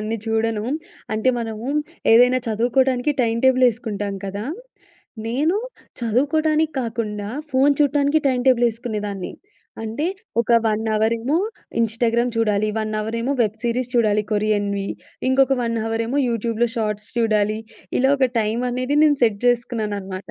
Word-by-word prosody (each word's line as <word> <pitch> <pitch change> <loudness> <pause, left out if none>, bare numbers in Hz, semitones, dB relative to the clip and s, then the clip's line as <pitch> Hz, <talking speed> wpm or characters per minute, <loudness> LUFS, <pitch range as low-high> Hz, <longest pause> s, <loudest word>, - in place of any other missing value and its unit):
అన్ని 215 +1 -2
చూడను. 225 -1 0 0.5
అంటే 220 +4 +1
మనము 225 0 -5 0.5
ఏదైనా 250 +2 +6
చదువుకోడానికి 245 +4 +1
టైమ్ 230 -1 0
టేబుల్ 260 -1 +5
ఏసుకుంటాం 210 -4 -4
కదా! 200 +2 -4 0.8
నేను 295 - +1 0.4
చదువుకోడానికి 305 +7 +1
కాకుండా 215 -4 -3 0.2
ఫోను 275 +2 +4
చూట్టానికి 285 +1 +3
టైమ్ 255 -2 +1
టేబుల్ 245 -2 +4
ఏసుకునేదాన్ని. 210 -4 -5 0.5
అంటే 225 +9 -2 0.3
ఒక 235 - -3 0.2
1 220 0 0
అవరేమో 230 +7 +1 0.4
ఇన్‌స్టాగ్రామ్ 230 +2 +1
చూడాలి, 215 -2 +1
1 215 0 -2
అవరేమో 230 +5 -2
వెబ్ 215 0 -2
సిరీస్ 245 +1 -1
చూడాలి 210 -3 +3
కొరియన్‌వి, 205 -1 0 0.4
ఇంకొక 270 +1 +4
1 230 0 -1
అవరేమో 230 +5 -1
యూట్యూబ్‌లో 230 0 0
షార్ట్స్ 210 -1 -2
చూడాలి. 215 -2 +2 0.4
ఇలా 265 +2 +3
ఒక 260 - +3
టైమనేది 250 +5 -1
నేను 290 -2 +3
సెట్ 210 -3 0
జేసుకున్నాననమాట. 210 -6 -1
230 Hz, 125 wpm, -21 LUFS, 215-255 Hz, 0.8 s, ఏదైనా